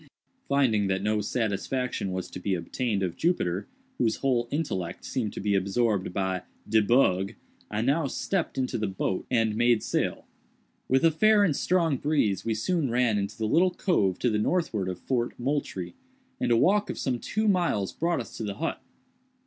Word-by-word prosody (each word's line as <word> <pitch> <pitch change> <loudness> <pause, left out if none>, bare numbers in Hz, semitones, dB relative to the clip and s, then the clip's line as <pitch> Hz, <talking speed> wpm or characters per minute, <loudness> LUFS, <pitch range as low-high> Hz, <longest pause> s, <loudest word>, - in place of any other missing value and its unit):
Finding 120 -8 +2
that 95 0 -1
no 105 0 +1
satisfaction 110 +1 -2
was 95 0 -4
to - - -6
be 95 +1 -1
obtained 100 +4 -2
of 90 -2 -2
Jupiter, 100 - 0 0.3
whose 110 -2 +2
whole 125 -3 0
intellect 120 - -3
seemed 110 -5 -2
to - - -6
be 100 0 0
absorbed 100 0 +1
by 95 -1 -1 0.3
"de 110 0 +4
bug," 100 -4 +3 0.4
I 105 0 -1
now 140 +5 +1
stepped 180 +5 -2
into 130 -3 -1
the 110 - 0
boat 95 0 -2
and 115 -4 +2
made 120 0 +3
sail. - - -1 0.6
With 130 +4 +3
a 165 - +6
fair 215 +6 +4
and 165 -8 +2
strong 165 -5 +1
breeze 125 - +1
we 115 -1 -1
soon 155 +5 0
ran 120 -3 +2
into 100 +3 -4
the 110 - -1
little 170 +10 +4
cove 105 - +1
to 120 - +1
the 105 - +1
northward 110 - 0
of 90 - -4
Fort 120 +4 -2
Moultrie, 120 -10 -2 0.5
and - - 0
a 115 - +5
walk 205 - +3
of - - -4
some 125 -3 -1
two 215 - -1
miles 175 - +1
brought 170 +2 0
us 115 - -10
to - - -4
the 100 -2 -3
hut. 165 - -3
115 Hz, 185 wpm, -27 LUFS, 100-145 Hz, 0.6 s, a